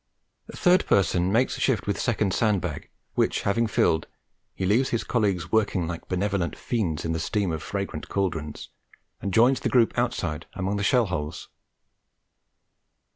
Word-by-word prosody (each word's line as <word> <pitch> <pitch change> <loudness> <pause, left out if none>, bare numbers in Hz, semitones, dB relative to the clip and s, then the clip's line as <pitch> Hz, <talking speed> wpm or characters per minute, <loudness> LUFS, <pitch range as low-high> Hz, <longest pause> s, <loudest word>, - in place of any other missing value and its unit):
Third 180 0 +3
person 90 -1 +2
makes 120 +5 +1
shift 125 -7 +1
with 100 - -1
second 105 -5 0
sand 105 -4 +2
bag, - - -5 0.2
which - - +1
having 115 +3 +1
filled, 80 -6 +1 0.5
he 95 - -2
leaves 115 +8 +3
his 115 - -1
colleagues 100 -7 0
working 105 -6 +1
like 85 -1 -6
benevolent 95 -1 -1
fiends 95 -12 -2
in 80 - -1
the 80 - -1
steam 100 +2 -1
of 80 -1 -3
fragrant 100 -1 -4
cauldrons, 85 -6 -3 0.5
and 100 - -2
joins 120 +7 +4
the - - -1
group 120 -3 +3
outside 85 -10 -2
among 95 +2 -1
the 100 - -2
shell 120 +4 +3
holes. 75 -6 -4
100 Hz, 155 wpm, -25 LUFS, 85-115 Hz, 0.5 s, joins